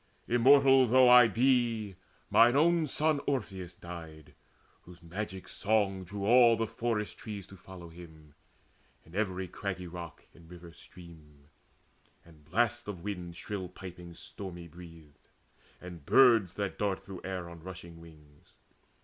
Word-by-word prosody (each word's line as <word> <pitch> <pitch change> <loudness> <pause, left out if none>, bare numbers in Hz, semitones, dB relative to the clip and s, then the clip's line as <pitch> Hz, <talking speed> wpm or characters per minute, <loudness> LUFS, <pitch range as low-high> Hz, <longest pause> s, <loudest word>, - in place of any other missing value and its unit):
Immortal 135 +2 +5
though 130 +2 +5
I 125 -1 +8
be, 115 -5 +1 0.4
Mine 120 +2 +5
own 165 +2 +3
son 150 +1 0
Orpheus 95 -10 -3
died, 80 -4 -11 0.5
whose 90 0 -16
magic 95 +2 -6
song 100 -3 -1
Drew 100 +2 -6
all 120 0 +6
the 115 - 0
forest 110 -1 -3
trees 105 -3 -7
to 100 - -14
follow 90 -2 -12
him, 80 -3 -15 0.7
And 80 - -18
every 95 -2 -2
craggy 95 0 -5
rock 85 -1 -9
and 85 -1 -18
river 90 -1 -12
stream, 80 -5 -16 0.8
And 80 -3 -19
blasts 115 +8 0
of 95 -5 -7
winds 90 -4 -6
shrill 100 -3 -5
piping 90 -2 -11
stormy 90 -2 -9
breathed, 85 -3 -15 0.5
And 90 -4 -11
birds 115 - +4
that 100 -2 -4
dart 100 -2 -1
through 95 -2 -9
air 95 -2 -5
on 85 -1 -12
rushing 85 -2 -10
wings. 75 -3 -19
95 Hz, 140 wpm, -30 LUFS, 85-115 Hz, 0.8 s, I